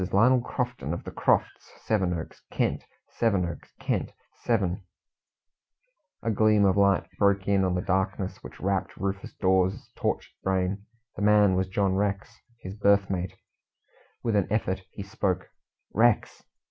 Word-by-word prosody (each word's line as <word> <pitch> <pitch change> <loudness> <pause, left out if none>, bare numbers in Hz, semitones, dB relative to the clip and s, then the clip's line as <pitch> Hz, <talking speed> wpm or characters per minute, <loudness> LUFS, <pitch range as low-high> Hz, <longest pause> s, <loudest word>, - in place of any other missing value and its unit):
Lionel 125 +5 +5
Crofton, 125 - -3
of - - -8
the - - -7
Crofts, - - 0
Sevenoaks, 90 -6 -1
Kent - - -1 0.2
Sevenoaks, 95 -7 -1
Kent - - -1 0.2
Seven 105 -4 -1 0.7
" - - -49
A 115 - +1
gleam 105 -1 +4
of 95 - +3
light 100 -1 +3
broke 100 -1 +2
in 100 -1 +3
on 90 -1 +1
the 90 - -1
darkness 95 +1 -1
which - - -11
wrapped 95 0 -1
Rufus 100 +1 -3
Dawes's 95 -1 +1
tortured - - -2
brain. 95 +2 -1 0.3
The - - -6
man 105 -1 +5
was 95 0 +1
John 95 0 +1
Rex, 100 +3 -1 0.3
his 95 - -7
berth 100 -1 +3
mate. 90 -1 -3 0.9
With 115 -3 0
an 100 -3 +2
effort 95 -3 0
he 100 - -8
spoke. 100 -3 -2 0.5
"Rex!" 115 +1 +2
100 Hz, 145 wpm, -27 LUFS, 95-105 Hz, 0.9 s, Lionel